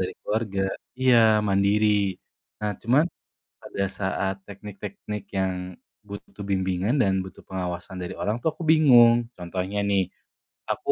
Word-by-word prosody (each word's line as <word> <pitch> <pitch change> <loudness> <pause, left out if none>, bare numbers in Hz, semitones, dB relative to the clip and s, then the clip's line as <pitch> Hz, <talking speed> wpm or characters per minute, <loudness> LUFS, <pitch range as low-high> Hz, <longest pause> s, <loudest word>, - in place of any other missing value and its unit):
dari 95 - -1
keluarga. 105 -2 -2 0.4
Iya, 130 -2 +4 0.3
mandiri. 100 0 +2 0.4
Nah 105 -1 -1
cuma, 125 +5 +3 0.6
pada 100 - -4
saat 95 0 -2
teknik-teknik 100 0 -7
yang, 95 -1 +1 0.5
butuh 100 0 -10
bimbingan 95 +4 0
dan 95 -7 +2
butuh 95 - -10
pengawasan 90 0 -5
dari 90 - -5
orang 105 +2 -1
tuh, 160 - +2
aku - - -7
bingung. 120 -6 +6
Contohnya 90 +3 -4
nih, 95 -3 +2 0.6
aku - - 0
100 Hz, 125 wpm, -25 LUFS, 95-110 Hz, 0.6 s, bingung